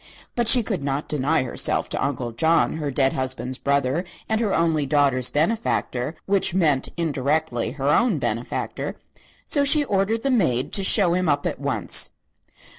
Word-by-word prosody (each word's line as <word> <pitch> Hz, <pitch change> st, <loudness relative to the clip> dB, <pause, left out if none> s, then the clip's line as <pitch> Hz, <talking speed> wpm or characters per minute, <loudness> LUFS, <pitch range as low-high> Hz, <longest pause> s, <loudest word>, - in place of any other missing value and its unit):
But 240 Hz, -2 st, 0 dB
she 240 Hz, +1 st, +7 dB
could 150 Hz, -, -3 dB
not 140 Hz, +1 st, -2 dB
deny 150 Hz, +1 st, 0 dB
herself 125 Hz, -, 0 dB
to -, -, -2 dB
Uncle 125 Hz, -3 st, -3 dB
John, 160 Hz, +7 st, +1 dB
her 150 Hz, -2 st, -3 dB
dead 135 Hz, 0 st, +1 dB
husband's 130 Hz, -1 st, -3 dB
brother 140 Hz, +3 st, 0 dB, 0.2 s
and 220 Hz, +1 st, 0 dB
her 215 Hz, -4 st, 0 dB
only 160 Hz, -4 st, +1 dB
daughter's 135 Hz, -4 st, +2 dB
benefactor 155 Hz, -, -1 dB
(which 195 Hz, -2 st, +2 dB
meant 150 Hz, -8 st, +1 dB
indirectly 145 Hz, -5 st, -1 dB
her 140 Hz, 0 st, -2 dB
own 215 Hz, +4 st, +2 dB
benefactor), 115 Hz, -3 st, -4 dB, 0.5 s
so 285 Hz, -, +2 dB
she 290 Hz, +1 st, +5 dB
ordered 210 Hz, -1 st, -1 dB
the 275 Hz, -, 0 dB
maid 140 Hz, -, 0 dB
to 195 Hz, -, +3 dB
show 190 Hz, -2 st, +4 dB
him 180 Hz, -2 st, 0 dB
up 145 Hz, 0 st, 0 dB
at -, -, -3 dB
once. -, -, 0 dB
150 Hz, 165 wpm, -22 LUFS, 135-195 Hz, 0.5 s, she